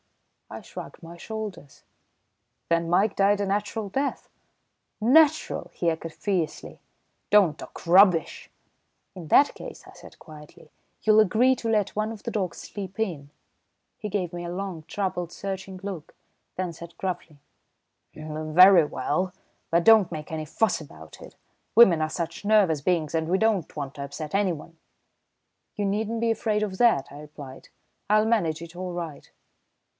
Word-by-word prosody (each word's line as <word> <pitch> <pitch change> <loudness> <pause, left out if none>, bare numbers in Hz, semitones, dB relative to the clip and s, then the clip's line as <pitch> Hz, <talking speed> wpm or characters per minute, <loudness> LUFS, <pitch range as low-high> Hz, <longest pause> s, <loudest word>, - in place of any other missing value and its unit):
I - - -7
shrugged - - -10
my 170 0 -11
shoulders. 210 -6 -8 0.9
"Then 170 0 +1
Mike 195 +4 +2
died 200 +1 +3
a 200 - 0
natural 205 +2 -2
death?" 275 +8 -3 0.7
"Natural?" 300 +7 +3
he 170 -1 0
echoed 165 0 -5
fiercely. 180 -3 -3 0.5
"Don't 190 -8 +4
talk - - -11
rubbish!" 180 -2 +4 0.7
"In 175 -4 -9
that 285 - +5
case," - - -10
I - - -14
said - - -15
quietly, 150 -1 -14 0.3
"you'll 215 0 +5
agree 235 +6 +3
to 230 -2 -4
let 210 -3 0
one 215 +1 -1
of 220 -3 -10
the - - -4
dogs 185 -5 -2
sleep 195 -1 -8
in." 165 -10 -3 0.7
He 210 - -5
gave 185 -4 -2
me 175 0 -5
a 170 - -5
long, 185 -4 -5
troubled, 180 -4 -3
searching 195 -1 -6
look, 185 -6 -7 0.4
then 180 -2 -3
said 170 +1 -12
gruffly: 175 -5 -5 0.8
"Very 155 +4 +5
well, 180 +5 -2 0.4
but 170 +1 +2
don't 220 -5 +6
make 155 -2 -7
any 155 -1 -4
fuss 195 +4 0
about 80 - -13
it. - - -12 0.4
Women 190 -9 +7
are 155 - 0
such 170 +3 -5
nervous 200 -8 +3
beings 165 -1 0
and 160 0 -1
we 185 - +3
don't 215 -6 0
want 140 -3 -5
to 140 - -6
upset 150 +2 -7
anyone." 170 -5 -2 1.0
"You 205 - -2
needn't 215 +3 -1
be 230 -1 +2
afraid 215 -1 0
of 190 -3 -4
that," 230 - +4
I 145 - -10
replied, 145 -3 -11 0.4
"I'll 215 +1 +4
manage 170 -9 0
it 170 +1 -11
all 180 0 -5
right." 165 -5 -7
185 Hz, 155 wpm, -25 LUFS, 160-210 Hz, 1.0 s, Women